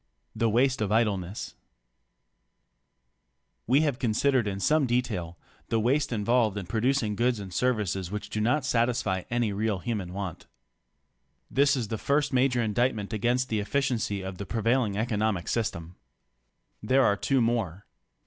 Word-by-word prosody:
THE 115 - +1
WASTE 125 +2 +2
OF 105 -1 -1
IDLENESS 105 -3 0 2.1
We 135 +5 +4
have 145 -5 0
considered 125 0 +2
in 100 -1 -3
some 150 +6 +2
detail 105 -9 -2 0.3
the 115 - +1
waste 135 +6 +1
involved 110 -1 +1
in 100 - -4
producing 115 +1 0
goods 120 +1 +1
and 95 -2 -8
services 105 -6 0
which 105 +1 -6
do 105 - -1
not 125 +5 +1
satisfy 115 -7 0
any 120 -3 0
real 105 0 0
human 100 -3 -4
want. 95 -3 -6 1.0
This 140 +1 +4
is 115 -5 -3
the 110 - -3
first 145 0 +1
major 125 -1 +2
indictment 110 -1 0
against 120 +4 0
the 110 - 0
efficiency 110 -4 -1
of 95 -1 -6
the 100 - -4
prevailing 115 -2 +1
economic 110 -4 -1
system. 95 -7 -3 0.8
There 130 +5 +3
are 100 - +3
two 135 +5 +1
more. 110 -6 -1
115 Hz, 145 wpm, -27 LUFS, 100-125 Hz, 2.1 s, We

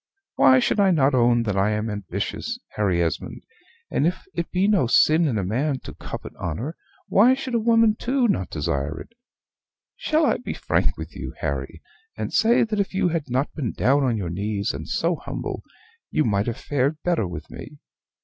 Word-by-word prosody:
Why 130 -1 +6
should 130 - +1
I 200 -1 +5
not 145 -6 +3
own 120 -1 +3
that 105 -4 -1
I 100 +2 +2
am 105 +1 -2
ambitious, 105 - -4
Harry 95 -5 +1
Esmond; 80 - -4 0.5
and 150 - +2
if 180 - -3
it 170 -1 -3
be 185 +2 +1
no 200 - +3
sin 155 +7 +4
in 120 -6 0
a 100 - -1
man 130 +9 0
to - - -9
covet - - -8
honor, 115 - -4 0.3
why 240 +6 +5
should 260 -1 -5
a 235 - +3
woman 230 -1 +4
too 250 +2 +1
not 95 - 0
desire 75 0 -2
it? - - -10 0.9
Shall 310 0 +1
I - - +2
be - - -6
frank - - 0
with - - -8
you, - - -6
Harry, - - -4 0.3
and - - -4
say 225 +3 +4
that 215 -2 -2
if 195 -1 -1
you 185 - +2
had 165 -5 -3
not 130 +4 -1
been 130 -8 -3
down 140 +2 +2
on 120 -4 +1
your 90 -5 -3
knees, 100 +2 -2
and 75 +3 -7
so 170 0 0
humble, - - -5 0.5
you 155 - +1
might 100 0 +1
have 115 - -2
fared 145 +2 0
better 170 - +1
with 80 -3 -8
me? 150 - -10
135 Hz, 195 wpm, -23 LUFS, -, 0.9 s, Why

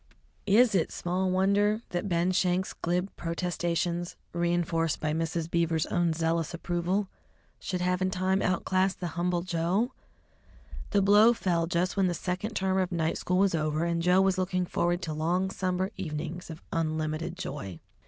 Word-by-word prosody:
Is 225 +3 +5
it 180 -4 +1
small 185 +2 -1
wonder 200 +4 +2
that 180 +3 -2
Ben 175 +1 +2
Schenk's 185 0 +1
glib 180 +3 -2
protestations, 175 0 -2 0.2
reinforced 170 -2 0
by 155 -1 -1
Mrs. 165 0 -1
Beaver's 165 -2 +1
own 175 -1 +1
zealous 165 0 -1
approval, 175 +4 -1 0.5
should 180 -1 -3
have 180 0 0
in 185 - +2
time 185 +1 0
outclassed 185 +1 +1
the 175 -2 -3
humble 175 +1 -1
Joe? 185 +7 0 1.0
The 200 -1 +2
blow 210 +4 +6
fell 175 -7 0
just 180 +2 0
when 195 -1 +3
the 175 - -1
second 185 +6 -3
term 190 0 +1
of 185 -1 0
night 165 -2 0
school 180 - 0
was 195 -1 +3
over, 155 0 0
and 170 -1 0
Joe 180 +2 +4
was 190 -1 +2
looking 185 0 0
forward 175 +1 0
to 155 - -3
long 175 +5 0
summer 185 0 -1
evenings 170 0 -5
of 160 0 -9
unlimited 155 +1 -2
joy. 100 - -6
175 Hz, 165 wpm, -28 LUFS, 165-185 Hz, 1.0 s, blow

